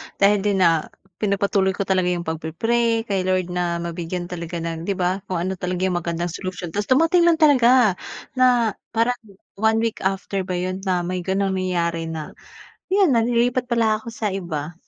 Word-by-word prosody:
dahil 200 +1 +4
din, 195 -1 +1
ah, 165 -2 +3 0.3
pinagpatuloy 200 -2 +1
ko - - -1
talaga 190 -2 +1
'yung 175 -1 -1
pagpi-pray 225 +9 0
kay 195 -4 -1
Lord 185 -1 0
na 175 -1 -1
mabigyan 170 +1 -4
talaga 170 -1 -5
ng 165 0 -4
'di 200 - +1
ba 180 +1 0
kung 185 - -3
ano 185 +2 -1
talaga 180 0 -3
'yung 185 -2 +1
magandang 170 0 -3
solusyon. 180 0 -5
Tapos 205 +4 -2
dumating 330 +6 +4
lang 340 - +5
talaga, 250 -8 +5 0.4
na 245 -3 +4 0.2
parang 235 +2 +2 0.4
one 220 +1 +3
week 230 -1 -2
after 195 0 -1
ba 185 - -2
'yun 185 +1 -2
na 180 -1 +1
may 180 +1 -2
ganung 195 0 0
nangyari 170 -3 -1
na, 160 -2 -6 0.6
'yun 385 -3 +4
na 235 - +4
lilipat 240 +2 +1
pala 225 -3 +2
ako 225 - -10
sa 215 -2 -2
iba. 170 -5 -4
190 Hz, 180 wpm, -22 LUFS, 175-225 Hz, 0.6 s, lang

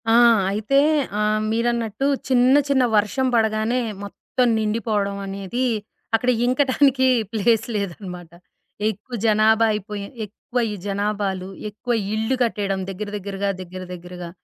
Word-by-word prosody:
ఆ! - - +5 0.4
అయితే 215 +7 +1 0.4
ఆహ్, 215 0 +1
మీరన్నట్టు 230 +1 0 0.2
చిన్న, 255 0 +5 0.2
చిన్న 265 -2 +3
వర్షం 210 +6 +1
పడగానే 220 +2 +1 0.2
మొత్తం 245 +5 -1
నిండిపోవడవనేది, 205 0 -2 0.5
అక్కడ 245 +3 +1 0.2
ఇంకటానికి 260 0 +3 0.2
ప్లేస్ 225 +1 +2
లేదనమాట. 180 -3 -5 0.6
ఎక్కువ 220 +5 -9
జనాభా 220 +1 +4
అయిపోయి, 210 -1 -5 0.2
ఎక్కువ 240 +4 -4
ఈ - - -3
జనాభాలు, 200 -2 -1 0.2
ఎక్కువ 225 +4 -3 0.2
ఇల్లు 220 +4 0
కట్టేయడం 200 -4 -1
దగ్గర 205 +2 -5
దగ్గరగా, 200 0 -3
దగ్గర 185 +1 -8
దగ్గరగా, 175 0 -8
215 Hz, 110 wpm, -22 LUFS, 200-240 Hz, 0.6 s, ఆ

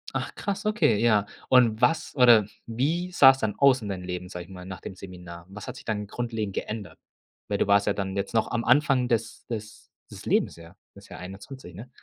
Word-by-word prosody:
Ach, - - -3
krass, 200 +1 -3
okay, 210 - +3
ja. 105 -2 +3 0.2
Und 120 -3 +4
was 155 +6 +1
oder 120 -5 +6 0.2
wie 160 +10 -1
sah's 135 -5 +7
dann 110 -4 -1
aus 135 -3 +5
in 105 - -6
deinem 95 -2 -4
Leben, 90 0 -5
sage 90 -2 -7
ich - - -20
mal, 90 -1 -9
nach 95 0 -8
dem - - -8
Seminar? 90 -2 -11
Was 105 +1 -9
hat - - -6
sich - - -12
dann 105 -2 -2
grundlegend 110 -3 -4
geändert? 105 -7 -6 0.5
Weil - - -1
du - - +1
warst 100 0 +3
ja 100 - +3
dann 95 -1 -4
jetzt 100 +3 -3
noch 110 - +1
am 120 -1 -1
Anfang 130 0 +3
des 115 -2 -2
des 105 -3 -7 0.2
des - - -10
Lebens, - - +1
ja, 85 +2 -14 0.2
das 100 0 -16
ja - - -9
21, 95 +2 -10
ne? 115 +7 -10
110 Hz, 220 wpm, -26 LUFS, 95-125 Hz, 0.5 s, sah's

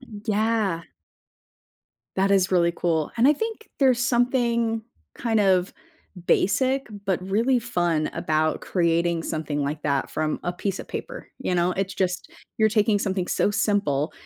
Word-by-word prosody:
Yeah. 215 -5 -1 1.3
That 195 +1 +2
is 190 -1 +3
really 170 -2 +3
cool, 160 -3 0
and 240 +4 +5
I - - +7
think 445 +7 -5
there's 260 -4 +4
something, 235 -2 +1 0.3
kind 225 -2 0
of, 190 -2 +2 0.5
basic 260 +6 +2 0.2
but 185 -2 0
really 230 +7 +1
fun 175 -9 0
about 155 -2 0
creating 170 -1 +1
something 155 -3 -2
like 145 +2 -3
that 140 -2 0
from 155 -1 -2
a 175 - -2
piece 195 +1 -3
of - - -11
paper, - - -7
you 265 -9 -1
know. 175 +1 +2
It's 195 0 -2
just, 185 0 -2 0.3
you're 220 -1 +5
taking 210 -1 +2
something 190 -3 -2
so - - +1
simple 195 -9 0
195 Hz, 145 wpm, -24 LUFS, 170-230 Hz, 1.3 s, I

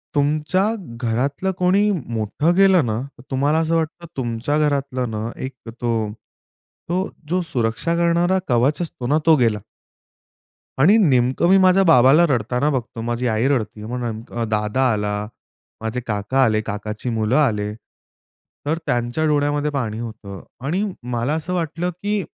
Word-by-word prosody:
तुमच्या 150 +6 +1 0.4
घरातलं 135 +10 0
कोणी 190 +3 +3
मोठं 130 - -1
गेलं 190 -5 +5
ना, 110 0 -1 0.3
तुम्हाला 145 +4 +2
असं 165 0 +1
वाटतं 165 +1 -2
तुमच्या 125 +4 -1
घरातलं 140 -4 0
ना, 110 +1 -3
एक 130 +1 -6 0.3
तो 115 -3 0 0.8
तो 185 +2 0 0.2
जो 180 +1 +1
सुरक्षा 130 +1 -1
करणारा 170 +2 +2
कवच 130 +6 +2
असतो 130 -7 -4
ना, 150 +4 +3
तो 160 -1 +7
गेला. 115 -4 +2 1.2
आणि 175 +11 +6
नेमकं 130 - +3
मी 195 - +6
माझ्या 190 0 +5
बाबाला 145 0 +6
रडताना 125 +3 +1
बघतो. 125 -4 -3
माझी 120 +2 -2
आई 110 +2 +1
रडती 115 -6 -1
आहे. 110 - -7
मग 125 - -3
नेमकं 115 +1 -5
अ, - - +1
दादा 105 +3 -1
आला, 105 0 -1 0.7
माझे 110 +3 -2
काका 110 +5 +1
आले, 110 -3 +2
काकाची 105 +2 -5
मुलं 110 +1 0
आले. 105 -7 +1 0.9
तर 155 +3 0
त्यांच्या 120 +6 0
डोळ्यामध्ये 145 0 +1
पाणी 115 -6 -3
होतं 110 -4 -8 0.2
आणि 180 +8 0 0.3
मला 120 +4 0
असं 160 +3 -3
वाटलं 170 0 -2
की 205 -1 0
130 Hz, 150 wpm, -21 LUFS, 115-160 Hz, 1.2 s, तो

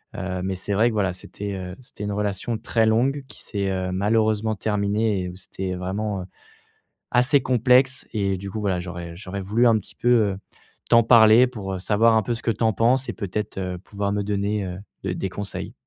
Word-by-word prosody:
Heu, 95 -1 -3
mais 95 0 -2
c'est 100 +2 -3
vrai 115 +4 +4
que - - -4
voilà, 95 -4 0
c'était, 100 +2 -7
heu, 90 -1 -6
c'était 120 -5 -10
une 105 - -2
relation 105 +3 -2
très 115 0 +1
longue 130 +6 +2
qui - - -12
s'est, 100 -3 -2
heu, 95 -1 -2
malheureusement 110 +2 +1
terminée 105 0 0
et 90 - -4
où 90 - -9
c'était 95 0 -5
vraiment, 95 +2 -3
heu, - - -7 0.9
assez 125 +3 +4
complexe 130 +1 +3
et 100 -2 0
du 100 +1 -7
coup, 110 - -4
voilà, 95 -3 0
j'aurais 85 -1 -7
j'aurais 100 +1 -6
voulu 110 +6 +2
un 115 -1 +5
petit 100 - -9
peu, - - -4
heu, 105 -5 +3 0.5
t'en 115 -1 +6
parler 115 +1 +7
pour, 100 -6 -6
heu, - - -5
savoir 110 +4 +3
un 110 - +4
peu 120 - -1
ce 115 - -8
que 115 - +2
tu 115 +2 -3
en 110 - +4
penses 125 +5 +2
et - - -2
peut-être, 105 0 -4
heu, 90 -1 -3
pouvoir 100 +1 -3
me 105 - 0
donner, 100 0 -1
heu, 90 0 -5 0.3
de 95 -2 -1
des 95 - -3
conseils. 100 +2 -6
105 Hz, 220 wpm, -23 LUFS, 95-115 Hz, 0.9 s, parler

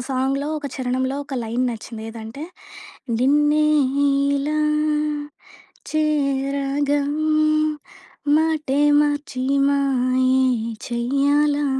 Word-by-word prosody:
సాంగ్‌లో 270 +2 -1
ఒక 295 - -6
చరణంలో 260 +1 -2
ఒక 280 -1 -7
లైన్ 235 +3 -1
నచ్చింది 225 0 -8
ఏదంటే, 225 +5 -9 0.8
నిన్నె 295 +4 +3 0.7
ఇలా 295 +2 -1 1.3
చేరగా, 280 -1 0 1.4
మాటె 305 -3 0 0.2
మార్చి 290 -3 -1 0.3
మాయే 260 -2 +2 0.5
చేయ్యాలా, 285 +4 +1
275 Hz, 70 wpm, -21 LUFS, 255-290 Hz, 1.4 s, నిన్నె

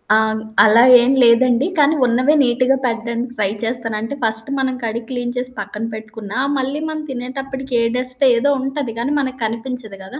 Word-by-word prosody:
అవును. 220 0 +1 0.2
అలా 220 +2 +5 0.2
ఏం 245 +2 +2
లేదండి. 245 +4 +3
కానీ, 295 +1 +3
ఉన్నవే 250 +5 +2
నీట్‌గా 255 +1 +2
పెట్టడానికి 235 +1 -3
ట్రై 205 -2 0
చేస్తాను. 230 -1 0
అంటే, 230 +5 -5
ఫస్ట్ 225 +2 +4
మనం 260 -1 -1
కడిగి 230 +1 -4
క్లీన్ 245 -1 -4
చేసి 250 0 -2
పక్కన 205 +2 -5
పెట్టుకున్నా 220 0 -7 0.2
మళ్ళీ 270 +2 -3
మనం 310 0 -5
తినేటప్పటికి 265 +1 -6
ఏ - - +1
డస్ట్ 255 +2 0
ఏదో 285 +5 +1
ఉంటది. 270 -2 -4
కానీ, 260 +5 -1
మనకు 260 -2 -4
కనిపించదు 225 -2 -6
కదా! 255 +9 -10
245 Hz, 170 wpm, -18 LUFS, 225-265 Hz, 0.2 s, అలా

